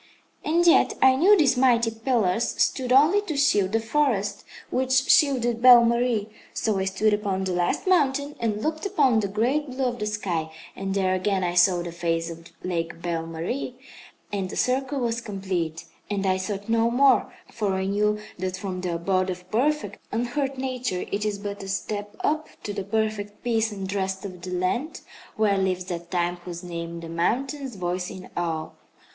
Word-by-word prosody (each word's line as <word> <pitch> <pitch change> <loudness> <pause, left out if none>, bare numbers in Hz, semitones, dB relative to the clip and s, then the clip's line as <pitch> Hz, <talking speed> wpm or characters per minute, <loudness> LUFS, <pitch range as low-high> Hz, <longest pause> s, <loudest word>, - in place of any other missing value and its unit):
"And 340 +3 +2
yet 340 - +5
I 260 0 +6
knew 385 +9 +6
these 295 -7 +4
mighty 240 -3 +3
pillars 225 -2 0
stood 255 -2 +1
only 305 +10 +5
to 320 -8 -4
shield 205 -9 +3
the 225 - +3
forest 225 -4 0 0.3
which 260 0 +2
shielded 245 -7 +3
Belle 245 -1 +9
Marie. 235 -3 +1 0.3
So 215 -4 0
I 190 - 0
stood 200 +3 +1
upon 200 -2 -1
the 190 - -1
last 175 0 0
mountain 285 -5 +2
and 215 -2 -1
looked 315 0 -2
upon 275 - +3
the 205 - 0
great 245 +9 0
blue 260 +1 -2
of 245 -1 -2
the 210 - -2
sky, 175 -7 -2 0.2
and 195 0 -3
there 190 -1 +2
again 185 0 0
I 175 -1 0
saw 175 0 +4
the 175 - -6
face 165 0 -1
of 165 0 -11 0.2
Lake 170 -2 -3
Belle 165 -2 -2
Marie; 170 +11 -4 0.6
and 195 -2 -2
the - - -6
circle 265 +2 0
was 235 0 -1
complete, 190 -7 -3 0.2
and 200 -1 -1
I 185 -1 +2
sought 200 +1 -4
no 230 0 +2
more, 260 +2 +4 0.2
for 205 -4 -1
I 190 0 -1
knew 210 +2 +1 0.2
that 185 0 -3
from 185 -1 -4
the 180 -2 -2
abode 185 +2 0
of 180 0 -7
perfect, 250 -2 0
unhurt 265 +4 -2
nature 255 -7 -2
it 200 +1 -1
is 210 -1 -1
but 200 0 -6
a 195 - -7
step 205 +1 -4
up 310 +1 0 0.2
to 205 - -4
the 200 -1 -3
perfect 210 0 -2
peace 225 -2 +1
and 195 -1 -5
rest 190 0 -2
of 180 -3 -8
the 185 - -7
land 185 - -2 0.3
where 205 -2 +2
lives 185 -1 0
that 175 -1 -6
Time 175 -1 0
whose 175 0 -8
name 170 -1 -6
the 165 - -7
mountains 255 - -1
voice 180 0 -2
in 185 - -10
awe. 160 -2 -2
205 Hz, 185 wpm, -25 LUFS, 185-250 Hz, 0.6 s, Belle